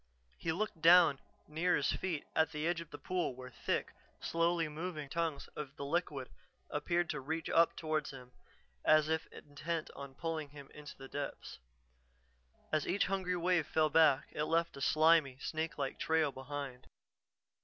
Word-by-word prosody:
He 165 - -1
looked 180 -1 -3
down 170 -4 +7 0.3
near 170 +4 +1
his - - +1
feet 175 -6 -2
at 160 0 +3
the 150 0 -3
edge 170 0 0
of 165 - -10
the 145 - -8
pool 180 -7 -2
where 125 0 -9
thick, - - -2 0.3
slowly 165 0 +1
moving 155 -1 -5
tongues 165 -2 -2
of 140 -2 -6
the 140 - -5
liquid 145 -4 -1 0.4
appeared 175 0 0
to 150 - -3
reach 160 +4 -3
up 165 0 +4
toward 155 -2 -1
him, 125 -2 -10 0.5
as 155 0 +5
if 160 0 0
intent 155 +3 -5
on 140 -1 -8
pulling 160 -1 -3
him 140 -1 -12
into 145 -2 -10
its 135 - -11
depths. 145 -1 -5 1.1
As 155 -2 +1
each 200 - +2
hungry 185 -2 -1
wave 175 -3 +2
fell 155 -1 +2
back, 150 -4 +5
it 150 - -1
left 165 +2 +1
a 140 - -8
slimy, 155 -2 +4
snake 160 +3 -3
like 135 -2 -3
trail 160 -2 +2
behind. 135 -1 -6
155 Hz, 165 wpm, -34 LUFS, 140-165 Hz, 1.1 s, down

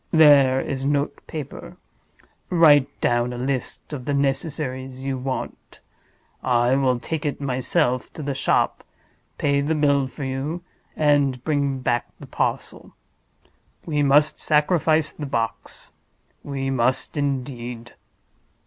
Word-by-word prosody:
There 140 -5 +6
is 135 -1 -3
note 140 +1 0
paper. 155 -4 -7 0.7
Write 150 -6 +6
down 120 0 +1
a - - -6
list 130 +3 -3
of 130 -4 -5
the 145 - 0
necessaries 135 -2 -2
you 135 -1 -2
want. 130 +1 -5 0.6
I 120 0 +2
will 130 -3 +2
take 160 +4 -4
it 145 - -2
myself 125 -2 0
to 155 - -7
the 140 0 -2
shop, 135 - +1 0.5
pay 140 -1 +1
the 155 +3 0
bill 140 -3 +2
for 140 +2 -8
you, 135 +6 -3 0.3
and 145 -4 +2
bring 140 -3 0
back 120 -1 0
the - - -9
parcel. - - -3 0.9
We 150 -3 0
must 145 +2 +4
sacrifice 155 0 +2
the 150 - -6
box—we 135 +3 -5
must, 130 +3 0
indeed." 125 -4 -3
140 Hz, 120 wpm, -23 LUFS, 130-145 Hz, 0.9 s, There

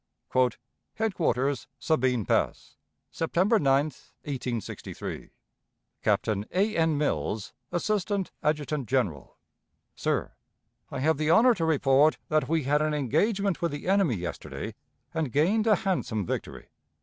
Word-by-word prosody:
_ 130 -1 +3 0.4
"HEADQUARTERS, 155 - 0
SABINE 130 - +1
PASS, - - 0 0.4
"September 185 +7 +2
9, 135 0 +3
1863. 130 -5 -6 0.7
"Captain 105 -2 +1
A. 205 +4 +1
N. 160 -2 +2
MILLS, 110 -7 -1 0.2
Assistant 200 +1 -1
Adjutant 150 -4 -1
General. 100 - -1 0.6
"SIR: - - -1 0.6
I - - -4
have 155 +1 +2
the 155 0 +1
honor 240 +8 +6
to 170 -7 -1
report 145 -1 +4
that 155 -1 +1
we 160 -2 +1
had 145 +3 +2
an 155 0 +1
engagement 190 - +1
with 170 - 0
the 145 +3 -6
enemy 190 - +3
yesterday 85 -3 -5 0.4
and 160 -6 -1
gained 195 - +2
a 215 - +6
handsome 145 - -1
victory. - - -5
150 Hz, 125 wpm, -27 LUFS, 130-180 Hz, 0.7 s, honor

